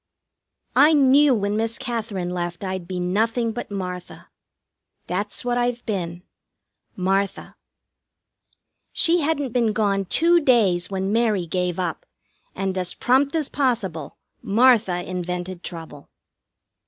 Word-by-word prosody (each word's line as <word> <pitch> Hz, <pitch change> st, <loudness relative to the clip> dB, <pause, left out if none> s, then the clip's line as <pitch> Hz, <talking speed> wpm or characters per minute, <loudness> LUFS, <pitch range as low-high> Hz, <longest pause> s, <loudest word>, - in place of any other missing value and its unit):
I 305 Hz, +2 st, +6 dB
knew 280 Hz, -1 st, +5 dB
when 205 Hz, -1 st, -1 dB
Miss 225 Hz, +1 st, -1 dB
Katherine 220 Hz, -8 st, -3 dB
left 175 Hz, +1 st, -4 dB
I'd 185 Hz, -2 st, -4 dB
be 185 Hz, -1 st, -4 dB
nothing 225 Hz, +6 st, 0 dB
but 240 Hz, +2 st, -6 dB
Martha. 180 Hz, -3 st, -6 dB, 0.8 s
That's 205 Hz, +6 st, -3 dB
what 245 Hz, 0 st, +1 dB
I've 245 Hz, 0 st, -1 dB
been 175 Hz, -4 st, -4 dB, 0.7 s
Martha. 195 Hz, +1 st, -1 dB, 1.4 s
She 345 Hz, +1 st, +2 dB
hadn't 290 Hz, -4 st, -1 dB
been 235 Hz, -4 st, +2 dB
gone 200 Hz, -2 st, +1 dB
two 340 Hz, -, +4 dB
days 215 Hz, -, +3 dB
when 195 Hz, +1 st, -2 dB
Mary 220 Hz, -6 st, +1 dB
gave 180 Hz, +1 st, -2 dB
up, 175 Hz, -4 st, -3 dB, 0.5 s
and 190 Hz, 0 st, -2 dB
as 180 Hz, -1 st, -3 dB
prompt 275 Hz, +4 st, +2 dB
as 310 Hz, -4 st, 0 dB
possible 215 Hz, -, -2 dB, 0.2 s
Martha 220 Hz, -5 st, +3 dB
invented 180 Hz, 0 st, -4 dB
trouble. 160 Hz, -5 st, -8 dB
200 Hz, 120 wpm, -23 LUFS, 180-245 Hz, 1.4 s, I